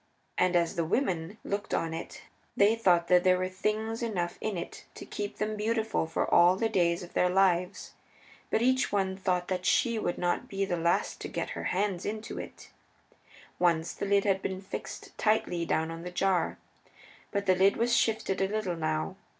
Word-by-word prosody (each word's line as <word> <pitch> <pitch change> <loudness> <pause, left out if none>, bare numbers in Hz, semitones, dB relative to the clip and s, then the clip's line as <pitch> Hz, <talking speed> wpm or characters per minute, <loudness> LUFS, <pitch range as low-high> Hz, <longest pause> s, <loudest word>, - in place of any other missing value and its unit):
And 180 0 +2
as 170 -1 +1
the 170 - +2
women 180 - -1
looked 200 +1 -2
on 165 -1 -1
it 165 - -7 0.3
they 205 +3 +5
thought 175 -6 +3
that 180 0 +5
there 185 0 +4
were 185 0 -1
things 215 +4 -2
enough 185 -7 -2
in 215 -4 -2
it 170 - -7
to - - -8
keep 205 -1 -5
them 215 +1 -2
beautiful 220 -3 0
for 160 - -1
all 175 +1 +6
the 225 +3 0
days 175 -3 +1
of 175 - -11
their 180 - +3
lives. 180 -1 +1 0.6
But 225 - +1
each 260 +1 +2
one 190 -2 0
thought 180 -2 -1
that 185 -1 -1
she 230 +5 +2
should 175 - -2
not 175 0 -1
be 195 0 -1
the 180 - -1
last 170 +1 0
to - - -4
get - - -4
her - - -5
hands 190 -1 0
into 215 +1 -4
it. - - -10 0.9
Once 170 -2 +2
the - - -4
lid 200 0 +3
had 195 -2 +1
been 190 -1 -3
fixed 195 - -8
tightly 180 -6 +1
down 160 +1 0
on 165 0 -7
the 180 - -6
jar. 185 0 0 0.7
But 200 -1 -2
the 185 - +5
lid 190 +2 +3
was 235 +1 +2
shifted 215 -4 +1
a 195 - +3
little 200 -3 -2
now. 155 +3 -2
190 Hz, 195 wpm, -29 LUFS, 175-210 Hz, 0.9 s, all